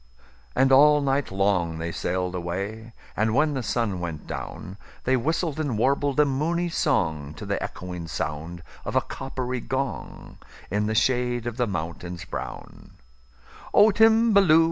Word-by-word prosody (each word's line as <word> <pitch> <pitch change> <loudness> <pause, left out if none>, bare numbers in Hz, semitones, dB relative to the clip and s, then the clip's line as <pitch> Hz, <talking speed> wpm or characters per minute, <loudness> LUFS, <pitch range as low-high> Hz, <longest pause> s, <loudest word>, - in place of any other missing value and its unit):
And 135 0 +4
all 150 +2 +7
night 140 0 0
long 95 -4 +1
they 85 +1 -3
sail'd 90 +1 -2
away; 100 +6 -4 0.2
And, 110 +1 +1
when 150 +1 +3
the 135 - -2
sun 110 -5 -1
went 85 -3 -5
down, 95 +2 -7 0.3
They 130 - +2
whistled 155 +4 -1
and 140 -8 -1
warbled 140 +4 +1
a 150 - +6
moony 165 +6 0
songTo 80 - -1
the - - -1
echoing 90 -2 -6
sound 80 +2 -4 0.2
of - - -5
a - - +5
coppery 130 -1 -4
gong, 130 -7 -4 0.3
In 105 +1 +1
the 110 - -1
shade 120 0 +1
of 120 -1 -4
the 125 -2 +1
mountains 85 0 -5
brown,"O 60 - -2
Timballoo! 220 -6 +5
115 Hz, 145 wpm, -25 LUFS, 85-140 Hz, 0.3 s, all